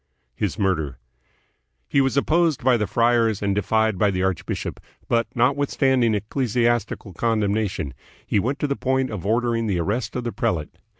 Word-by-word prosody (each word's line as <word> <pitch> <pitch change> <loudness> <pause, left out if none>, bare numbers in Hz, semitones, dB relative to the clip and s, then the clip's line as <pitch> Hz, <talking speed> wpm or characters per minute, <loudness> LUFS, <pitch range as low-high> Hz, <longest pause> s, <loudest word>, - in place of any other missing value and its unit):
His 100 - -2
Murder. 80 - 0 0.9
He 140 - +3
was 135 +1 +1
opposed 160 0 +2
by 130 0 +5
the 105 -3 0
friars 115 -3 +2
and 100 -1 +1
defied 110 0 +1
by 105 - +4
the 95 -1 -1
archbishop, 95 -3 -2 0.3
but, 115 -1 +1
notwithstanding 130 -2 +2
ecclesiastical 115 -2 -1
con 115 +5 0
demnation, 100 -8 -1 0.3
he 105 - +1
went 130 +7 -1
to 150 - -1
the 140 - -1
point 130 -2 0
of 100 -3 -5
ordering 115 0 +1
the 95 -4 0
arrest 105 +6 -2
of 125 - -2
the 120 - -2
prelate. 80 -8 -2
115 Hz, 165 wpm, -23 LUFS, 100-125 Hz, 0.9 s, by